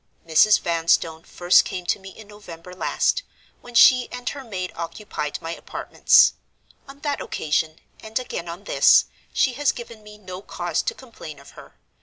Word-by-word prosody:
"Mrs. 165 +6 +5
Vanstone 165 -1 +1
first 175 0 +4
came 180 -1 -6
to 175 - 0
me 195 0 -11
in 215 +2 -14
November 180 -4 -12
last, 345 - 0 0.4
when 245 -1 -13
she 250 +1 +6
and 250 0 -8
her 280 -1 -7
maid 185 -6 -5
occupied 165 -3 -5
my 165 +1 -4
apartments. - - +3 0.5
On 275 +1 -14
that 290 -1 -2
occasion, 155 +1 -2 0.2
and 220 0 -5
again 240 -9 -5
on 175 +4 -8
this, - - +5 0.3
she 260 - +1
has 285 +3 +1
given 230 -2 -10
me 210 0 -14
no 185 -2 -9
cause - - -3
to 480 - -3
complain 225 - -11
of 140 - -15
her. - - -15
195 Hz, 170 wpm, -23 LUFS, 170-240 Hz, 0.5 s, she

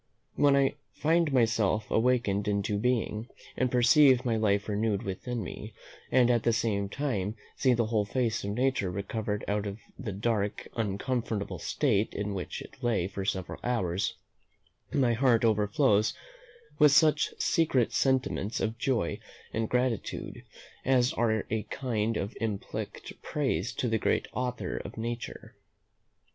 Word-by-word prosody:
When 145 -1 +4
I 140 +1 +2 0.2
find 165 0 +2
myself 110 -4 +2
awakened 110 -4 +2
into 100 0 0
being, 115 -1 0 0.3
and 130 - +1
perceive 130 +1 +5
my 115 -2 +1
life 100 -2 +1
renewed 105 0 0
within 115 +4 -4
me, - - -8 0.4
and 125 -1 +5
at 120 -1 +2
the 115 +1 +2
same 105 -3 0
time 110 -6 -2 0.2
see 130 -2 +3
the 115 -1 +1
whole 110 -2 +1
face 115 +1 -1
of 100 - -3
nature 125 -2 0
recovered 105 +2 -3
out 105 0 -1
of 100 0 -5 0.2
the 115 -6 -4
dark 105 0 -1
uncomfortable 105 -3 -2
state 110 - 0
in 105 0 -2
which 95 -2 -5
it - - -16
lay 110 -7 +1
for 100 0 -5
several 95 -1 -3
hours, 100 -5 0 0.8
my 125 -4 +2
heart 120 -1 +3
overflows 105 +1 +2 0.6
with 150 -2 +7
such 150 +1 +4
secret 140 -8 +2
sentiments 130 -5 +1
of 115 +1 -2
joy 115 -10 0 0.3
and 110 0 -1
gratitude, 125 -3 -1 0.4
as 130 -1 +3
are 110 -2 +1
a 110 0 +1
kind 115 -4 -1
of 100 +4 -4
implicit 105 -3 -5
praise 120 - -1
to 125 - -1
the 110 -1 +1
great - - +1
Author 125 -1 -3
of - - -7
Nature. 115 +1 -5
115 Hz, 145 wpm, -29 LUFS, 105-125 Hz, 0.8 s, with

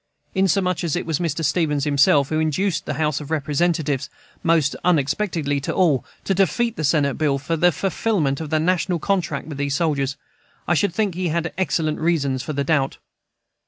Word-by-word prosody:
Inasmuch 185 -1 +1
as 165 -4 0
it 175 - -2
was 160 -3 -1
Mr. 165 -2 -1
Stevens 150 -2 +1
himself 140 -1 +3
who 155 - 0
induced 160 +2 0
the - - -2
House 150 -1 0
of 145 - -9
Representatives, 150 -1 0 0.3
most 160 -4 +2
unexpectedly 160 -2 0
to - - -2
all, 160 -9 +3 0.2
to 195 - 0
defeat 220 +5 +1
the 155 - -4
Senate 140 -1 +1
bill 145 -3 +2
for 145 +5 -2
the 175 +2 +4
fulfillment 165 -4 -1
of 155 - -5
the 155 - +1
national 180 +2 +1
contract 165 -6 -1
with 145 -2 -7
these 140 -1 0
soldiers, 145 -5 0 0.5
I 175 - +3
should 175 +5 +2
think 210 -3 0
he 180 +1 -2
had 165 0 -1
excellent 160 -3 0
reasons 140 -6 0
for 155 - -5
the 140 0 -1
doubt. 140 -2 0
155 Hz, 185 wpm, -22 LUFS, 145-175 Hz, 0.5 s, the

